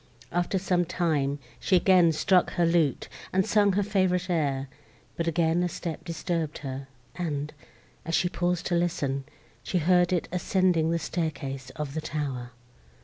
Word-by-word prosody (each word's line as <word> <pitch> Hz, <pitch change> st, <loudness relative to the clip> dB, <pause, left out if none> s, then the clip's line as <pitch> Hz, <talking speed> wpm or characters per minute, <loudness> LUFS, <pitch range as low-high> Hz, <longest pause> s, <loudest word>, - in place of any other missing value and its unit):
After 175 Hz, +2 st, 0 dB
some 180 Hz, -1 st, +1 dB
time, 155 Hz, -5 st, 0 dB, 0.2 s
she 190 Hz, -, +2 dB
again 180 Hz, -2 st, +5 dB
struck 180 Hz, +3 st, +2 dB
her 175 Hz, -2 st, +2 dB
lute, 165 Hz, -4 st, +2 dB, 0.2 s
and 190 Hz, 0 st, +2 dB
sung 205 Hz, -2 st, +3 dB
her 205 Hz, +2 st, +2 dB
favourite 185 Hz, -2 st, +1 dB
air; 140 Hz, -5 st, 0 dB, 0.5 s
but 170 Hz, -, -2 dB
again 165 Hz, +1 st, +2 dB
a 180 Hz, -, +1 dB
step 165 Hz, -2 st, -5 dB
disturbed 165 Hz, -2 st, -2 dB
her, 135 Hz, 0 st, -5 dB, 0.3 s
and, 150 Hz, -4 st, -3 dB, 0.5 s
as 165 Hz, +1 st, -1 dB
she 180 Hz, -, +2 dB
paused 175 Hz, 0 st, -1 dB
to 180 Hz, -, -1 dB
listen, 145 Hz, -6 st, 0 dB, 0.4 s
she 180 Hz, -, -1 dB
heard 180 Hz, +1 st, +3 dB
it 180 Hz, -2 st, 0 dB
ascending 180 Hz, -2 st, +2 dB
the 170 Hz, -, +1 dB
staircase 140 Hz, -6 st, -3 dB
of 150 Hz, -2 st, -4 dB
the 160 Hz, -, -2 dB
tower. 135 Hz, -6 st, -3 dB
170 Hz, 155 wpm, -27 LUFS, 150-180 Hz, 0.5 s, again